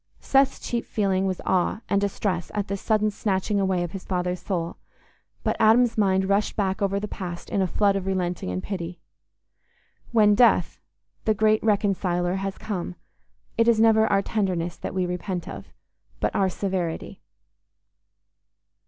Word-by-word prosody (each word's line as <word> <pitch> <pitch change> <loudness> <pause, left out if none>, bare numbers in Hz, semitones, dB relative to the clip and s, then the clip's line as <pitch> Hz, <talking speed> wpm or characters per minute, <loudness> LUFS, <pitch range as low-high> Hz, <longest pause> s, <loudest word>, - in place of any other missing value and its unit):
Seth's 275 0 +2
chief 235 -1 -3
feeling 195 -2 0
was 185 -1 -2
awe 185 +3 +1
and 200 - +1
distress 195 -3 -1
at 205 -1 -2
this 200 -1 -3
sudden 215 -1 +2
snatching 200 0 -1
away 190 -2 +1
of 175 - -5
his 195 0 -7
father's 180 -1 -2
soul; 170 -4 -3 0.7
but - - 0
Adam's 230 +2 +5
mind 190 -2 +2
rushed 200 +2 +1
back 195 -2 -1
over 200 0 +1
the 210 - -4
past 175 -4 -7
in 200 - +1
a 190 - +2
flood 200 +2 +2
of 195 -1 -3
relenting 180 - -1
and 90 0 -3
pity. 180 -3 -5 1.1
When 210 -3 +5
death, 235 +3 +3 0.5
the 220 - +2
great 215 +1 +3
Reconciler, 190 -4 +1
has 195 0 -4
come, 185 -4 -4 0.6
it 230 - +4
is 230 -2 +4
never 220 -1 +5
our 200 -1 +2
tenderness 180 -6 -1
that - - -6
we 185 -1 +1
repent 180 0 -4
of, - - -8 0.5
but - - -1
our 190 -1 +2
severity. 185 -3 -3
195 Hz, 160 wpm, -25 LUFS, 180-210 Hz, 1.1 s, Adam's